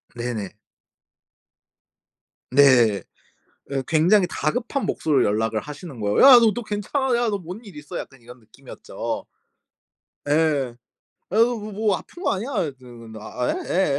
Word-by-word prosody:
네네. 115 -5 -5 2.0
네. 125 -8 +5 0.7
예 135 -1 -2
굉장히 175 +6 +3
다급한 245 - -2
목소리로 145 -5 +1
연락을 110 +1 0
하시는 150 -1 -9
거예요. 105 -1 0
"야 260 -3 +10
너, 225 -3 +3
너 240 - -5
괜찮아. 235 +5 -1
야 240 -1 +1
너 205 - -1
뭔 180 +3 -8
일 200 - -12
있어?" 150 0 -8
약간 135 -3 -10
이런 125 +1 -14
느낌이었죠. 120 +4 -7 1.0
예. 145 -5 +1 0.6
"아 195 - -2
그 230 +2 +6
뭐 210 +1 -7
뭐 210 0 +1
아픈 350 - -12
거 - - +1
아니야?" 220 +4 -2
이랬드 140 -5 -5
근데 115 -2 -11
"아. 125 +3 -4
예. 160 -7 0
150 Hz, 265 characters per minute, -23 LUFS, -, 2.0 s, 야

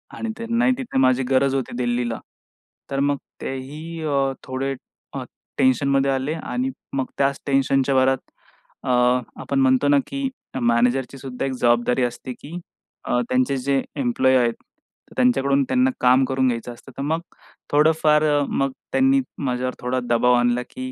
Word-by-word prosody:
आणि 225 - -4
त्यांनाही 235 +2 +1
तिथे 260 - -4
माझी 130 0 +3
गरज 135 +1 +3
होती 130 -3 -2
दिल्लीला. 120 -2 -1 0.7
तर 135 - -1
मग 140 0 +1 0.2
तेही 150 +5 -6
अ, 140 -3 +1
थोडे 135 +1 -3 0.4
अ, - - -4 0.3
टेन्शनमध्ये 135 +1 +3
आले 135 +3 -1
आणि 250 +11 -3 0.2
मग 135 -1 0
त्याच 140 0 +1
टेन्शनच्या 135 0 +2
भरात 130 0 +4 0.7
अ, - - -4 0.5
आपण 140 - -1
म्हणतो 130 +2 +3
ना, 145 - +5
की 275 -1 -2 0.3
मॅनेजरची 125 +3 +1
सुद्धा 130 -1 -5
एक 135 - -1
जबाबदारी 120 0 +2
असते, 125 +1 -4
की 155 +7 -9 0.5
अ, 125 - +1
त्यांचे 130 +2 +1
जे 135 +1 0
एम्प्लॉयी 130 0 +2
आहेत 120 -2 +2 0.6
त्यांच्याकडून 135 +2 +3
त्यांना 255 - +2
काम 130 +1 +5
करून 130 0 +1
घ्यायचं 120 0 -2
असतं, 135 +3 -15
तर - - -4
मग 160 +3 0 0.5
थोडंफार 155 0 +4 0.2
अ, - - +1
मग 135 0 0 0.2
त्यांनी 270 +1 +4 0.2
माझ्यावर 125 0 -1
थोडा 125 +1 -1
दबाव 120 +1 +4
आणला, 120 0 +2
की 260 0 -6
135 Hz, 150 wpm, -22 LUFS, 125-145 Hz, 0.7 s, ना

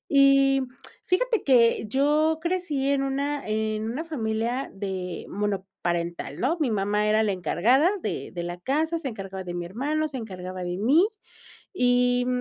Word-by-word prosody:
Y 275 0 +5 0.4
fíjate 455 +4 +1
que 235 -4 +4
yo 300 +6 +2
crecí 340 -6 -1
en 280 -1 +2
una 280 +1 -2
en 215 0 -1
una 265 +8 -3
familia 240 -4 -2
de 190 -3 -5
monoparental, 190 -4 -3
¿no?, 300 +8 +1
mi 295 -5 +1
mamá 210 0 +1
era 215 +1 +3
la 210 - +1
encargada 215 - +3
de - - -4
de 175 -1 -5
la 175 +1 -5
casa, 315 - 0
se 290 - -5
encargaba 195 -5 -6
de 175 -1 -6
mi 175 -1 -3
hermano, 290 - -1
se 275 - -6
encargaba 185 -5 -6
de 175 0 -3
mí, 285 - +4 0.7
y 245 -4 +2
240 Hz, 155 wpm, -26 LUFS, 195-280 Hz, 0.7 s, Y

